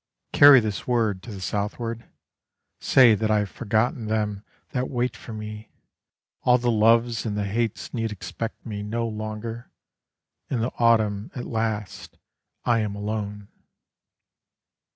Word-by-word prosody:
Carry 145 Hz, -2 st, +9 dB
this 110 Hz, -3 st, -4 dB
word 110 Hz, -6 st, +1 dB
to 115 Hz, -, -9 dB
the 100 Hz, -, -7 dB
southward; 110 Hz, +4 st, -3 dB, 0.7 s
Say 125 Hz, -4 st, +6 dB
that 110 Hz, +1 st, 0 dB
I 110 Hz, -, +3 dB
have 105 Hz, -2 st, -1 dB
forgotten 110 Hz, 0 st, 0 dB
them 105 Hz, -2 st, -1 dB, 0.3 s
that 130 Hz, -2 st, -2 dB
wait 125 Hz, -1 st, -1 dB
for -, -, -10 dB
me, 105 Hz, 0 st, -7 dB, 0.7 s
All 125 Hz, 0 st, +5 dB
the 120 Hz, 0 st, 0 dB
loves 115 Hz, +1 st, +3 dB
and 105 Hz, -2 st, -3 dB
the 105 Hz, -, -1 dB
hates 115 Hz, +2 st, -2 dB
need 115 Hz, -2 st, -2 dB
expect 115 Hz, +2 st, -6 dB
me 105 Hz, -2 st, -5 dB
no 115 Hz, +3 st, -2 dB
longer, 110 Hz, +2 st, -6 dB, 0.8 s
In 130 Hz, -, -1 dB
the 120 Hz, -, -2 dB
autumn 110 Hz, -3 st, +2 dB
at 125 Hz, -, -5 dB
last 110 Hz, -3 st, -3 dB, 0.5 s
I 120 Hz, -1 st, +3 dB
am 105 Hz, -2 st, -2 dB
alone. 105 Hz, -1 st, -4 dB
110 Hz, 140 wpm, -25 LUFS, 105-115 Hz, 0.8 s, Carry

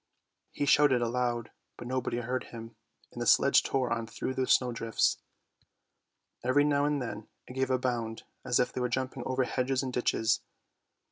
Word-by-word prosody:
He 145 Hz, -, -2 dB
shouted 135 Hz, -4 st, +4 dB
aloud, 120 Hz, -1 st, -1 dB, 0.3 s
but -, -, -8 dB
nobody 125 Hz, -1 st, -2 dB
heard 125 Hz, +1 st, -3 dB
him, 115 Hz, -1 st, -10 dB, 0.4 s
and -, -, -7 dB
the -, -, -1 dB
sledge -, -, +5 dB
tore 130 Hz, -3 st, 0 dB
on 115 Hz, -1 st, -3 dB
through 115 Hz, +3 st, -4 dB
the 130 Hz, -1 st, -1 dB
snowdrifts. 115 Hz, -3 st, +2 dB, 1.2 s
Every 130 Hz, +4 st, +3 dB
now 145 Hz, -1 st, +2 dB
and 145 Hz, -1 st, +1 dB
then 110 Hz, -4 st, -6 dB, 0.2 s
it -, -, -10 dB
gave 130 Hz, 0 st, -1 dB
a 130 Hz, -, +2 dB
bound, 120 Hz, -3 st, -3 dB, 0.2 s
as 120 Hz, -, +1 dB
if 125 Hz, -, +1 dB
they 125 Hz, -, -3 dB
were 125 Hz, -, 0 dB
jumping 130 Hz, +1 st, -2 dB
over 130 Hz, 0 st, +1 dB
hedges 130 Hz, +1 st, -1 dB
and 130 Hz, -1 st, -4 dB
ditches. 115 Hz, -2 st, +1 dB
125 Hz, 175 wpm, -30 LUFS, 120-130 Hz, 1.2 s, sledge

